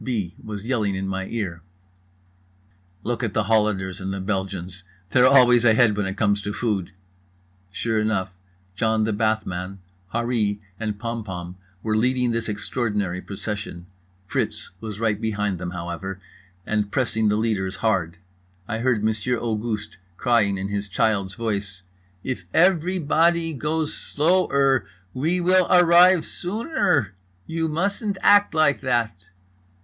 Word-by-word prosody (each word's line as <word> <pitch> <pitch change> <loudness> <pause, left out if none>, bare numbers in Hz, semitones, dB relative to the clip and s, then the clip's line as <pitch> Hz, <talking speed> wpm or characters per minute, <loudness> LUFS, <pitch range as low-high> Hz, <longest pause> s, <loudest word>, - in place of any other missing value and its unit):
B. 105 -9 -2
was 105 -1 -6
yelling 110 -6 0
in 95 0 -3
my 95 0 -3
ear: 90 -7 -4 1.4
"Look 120 +1 -2
at 110 -4 -2
the 110 - +3
Hollanders 105 -3 +1
and 95 +1 -3
the 100 - -3
Belgians! 95 -2 -3 0.3
They're 125 0 +6
always 125 -3 +6
ahead 115 -2 +5
when 105 -1 -1
it 95 - -5
comes 100 -2 +2
to 100 0 -4
food!" 100 -6 -1 0.8
Sure 110 +2 -1
enough: 100 -3 -1 0.4
John 110 +2 +1
the 110 0 0
Bathman, 100 -4 -1 0.3
Harree 115 -3 0 0.2
and 105 -2 -3
Pompom 100 -6 -5 0.3
were 110 -1 0
leading 125 +2 +2
this 115 -1 -2
extraordinary 105 -4 -2
procession. 100 -3 -6 0.4
Fritz - - -3
was 110 -1 -7
right 110 -2 0
behind 105 -4 -1
them, 90 - -4
however, 90 +2 -5 0.5
and 105 -1 0
pressing 110 -3 +1
the 105 - +2
leaders 105 -4 -1
hard. 90 -6 0 0.5
I 115 - -3
heard 120 -3 +1
Monsieur 110 +3 0
Auguste 110 -2 -3 0.2
crying 115 -5 +2
in 95 +1 -3
his 100 0 -3
child's 100 -2 0
voice: 100 -5 -3 0.4
"If 125 -9 -4
every 180 +1 +3
body 165 +1 +2
goes 150 +2 -2
slow 175 +5 +1
er 135 -4 +3 0.3
we 165 +7 0
will 185 +1 +4
ar 180 0 +5
rive 175 +1 +6
soon 215 - -4
er. 150 - +2 0.3
You 165 0 -2
mustn't 200 +5 -1
act 205 -4 +5
like 155 -3 +3
that!" 115 -8 -1
110 Hz, 145 wpm, -23 LUFS, 100-130 Hz, 1.4 s, They're